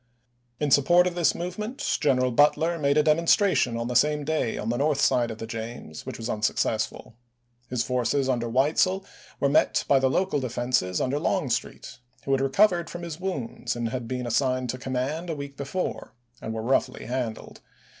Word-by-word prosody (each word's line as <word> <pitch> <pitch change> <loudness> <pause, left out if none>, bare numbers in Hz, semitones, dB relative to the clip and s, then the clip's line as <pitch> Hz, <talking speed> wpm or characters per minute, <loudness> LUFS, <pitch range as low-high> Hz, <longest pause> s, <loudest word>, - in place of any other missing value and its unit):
In 150 -2 0
support 175 +6 +5
of 180 - -1
this 175 -2 +2
movement 210 +8 -5 0.2
General 130 -3 +2
Butler 160 +6 +3
made 140 0 +2
a 150 - +5
demonstration 160 - +3
on 115 0 -3
the 125 - -3
same 150 +3 +3
day 150 -6 -1
on 110 - -3
the 120 - 0
north 145 +1 +1
side 120 -3 +2
of 110 - -6
the 115 - -6
James 115 -8 -7
which - - -5
was 115 - -5
unsuccessful. 110 -1 -1 0.6
His 125 -2 0
forces 125 +2 0
under 120 -3 0
Weitzel 155 +10 +2 0.3
were 140 - +2
met 140 - +2
by 140 - +5
the 130 0 +2
local 185 +1 +1
defenses 120 -7 -1
under 135 +3 0
Longstreet, 150 -7 -2 0.2
who 135 - -3
had 135 0 +2
recovered 175 +5 +3
from 175 0 -7
his 165 -1 -6
wounds 180 -15 -3
and 120 0 -3
been 125 +1 -3
assigned 130 +1 0
to 130 - -7
command 135 +7 -3
a 165 - -2
week 140 -1 -7
before, 140 +7 -4 0.3
and 110 - -5
were 110 0 -4
roughly 130 +1 0
handled. 120 -3 -4
135 Hz, 180 wpm, -26 LUFS, 120-155 Hz, 0.6 s, support